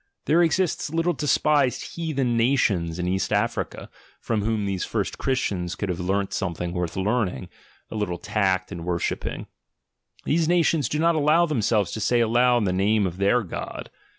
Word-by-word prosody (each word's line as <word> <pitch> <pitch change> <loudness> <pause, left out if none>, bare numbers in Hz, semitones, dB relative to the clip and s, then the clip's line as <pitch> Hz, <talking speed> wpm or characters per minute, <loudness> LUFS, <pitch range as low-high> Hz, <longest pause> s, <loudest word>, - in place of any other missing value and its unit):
— - - -54
There 165 +3 +4
exist 170 -2 +1
little 165 +2 +1
despised 145 -2 +1
"heathen 140 -8 -1
nations'' 105 -9 +1
in 90 0 -2
East 95 +1 -1
Africa, - - -1 0.3
from 110 -3 -1
whom 110 -1 -1
these 95 -2 -2
first - - -3
Christians 95 -9 -1
could 100 - -4
have 90 0 -2
learnt 95 +2 -1
something 90 -1 -3
worth 90 -1 -3
learning, 100 - -1 0.4
a - - -5
little 105 -5 -2
tact 95 0 0
in 85 - -6
worshipping; 85 -1 -3 0.8
these 160 +1 +1
nations 165 -5 +2
do 150 - -1
not 165 +2 +3
allow 155 +2 +3
themselves 110 - +1
to - - -4
say 120 +3 +2
aloud 120 0 +3
the 90 - 0
name 100 +2 +2
of 90 -1 -4
their 100 +5 +2
God. 90 - -7
110 Hz, 170 wpm, -24 LUFS, 95-145 Hz, 0.8 s, There